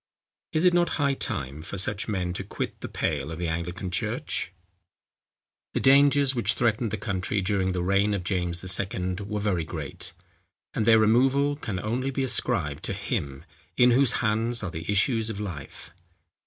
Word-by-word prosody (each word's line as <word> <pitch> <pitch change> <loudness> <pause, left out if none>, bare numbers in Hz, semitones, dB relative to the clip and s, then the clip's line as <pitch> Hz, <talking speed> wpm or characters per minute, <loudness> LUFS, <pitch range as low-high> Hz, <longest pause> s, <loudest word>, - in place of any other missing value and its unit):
Is 155 - +1
it 180 - +6
not 175 0 +2
high 140 -2 +2
time 75 - -3
for 90 - -6
such 100 +2 -3
men 90 -4 -1
to - - -4
quit - - -5
the - - -4
pale 75 -1 -2
of 80 - -5
the 85 0 -2
Anglican 85 +3 -3
church? 90 - -2 1.2
The - - +2
dangers 140 0 +5
which 120 -2 +1
threatened 115 -1 +1
the 110 - -3
country 95 0 -2
during 95 -1 0
the 90 -1 -1
reign 100 +2 +2
of 95 - -3
James 90 -2 -1
II. 95 -1 -1
were 105 +1 -3
very 100 -5 0
great; 80 -3 -6 0.6
and 110 - -1
their 110 -1 +7
removal 135 +6 +3
can 105 -10 -4
only 120 +6 -1
be 135 0 -1
ascribed 80 - 0
to - - -2
Him, 70 -1 -3 0.3
in 125 0 +6
whose 130 0 +5
hands 115 +2 +1
are 90 - -3
the 80 +4 -4
issues 110 +2 +2
of 105 -2 -5
life. 85 -10 -7
100 Hz, 175 wpm, -26 LUFS, 90-120 Hz, 1.2 s, their